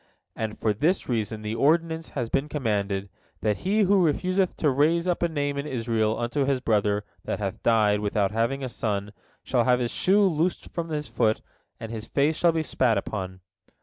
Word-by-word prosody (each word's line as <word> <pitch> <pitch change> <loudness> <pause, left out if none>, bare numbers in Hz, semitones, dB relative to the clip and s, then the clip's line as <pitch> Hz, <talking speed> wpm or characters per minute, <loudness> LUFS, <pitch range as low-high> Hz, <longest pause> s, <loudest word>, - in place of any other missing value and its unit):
And 110 -1 -4
for 110 - +1
this 160 - 0
reason 110 -2 -2
the 105 +1 -3
ordinance 160 +5 +1
has 120 -3 -1
been 140 +5 -1
commanded, 100 -8 -1 0.3
that 105 -2 +1
he 205 +4 +1
who 200 -1 +4
refuseth 185 +4 +1
to 150 - +2
raise 160 +6 +2
up 180 - 0
a 170 - +3
name 145 -2 -2
in 140 - -4
Israel 115 -4 0
unto 120 +4 -1
his 135 -1 +1
brother 105 -3 +1 0.2
that - - -2
hath 100 -3 -4
died 105 -3 +3
without 105 -1 0
having 115 +5 0
a - - -1
son, 105 -3 -3 0.3
shall - - +1
have 125 -1 +4
his 120 -1 -1
shoe 200 +3 +3
loosed 175 0 0
from 170 -1 -3
off 160 - -5
his 150 -1 -3
foot, 110 -2 +1 0.4
and 115 - -6
his 110 -1 -6
face 150 +3 +1
shall 170 +1 +3
be 160 -1 -1
spat 125 -7 +1
upon. 95 -2 -4
125 Hz, 200 wpm, -26 LUFS, 110-160 Hz, 0.4 s, who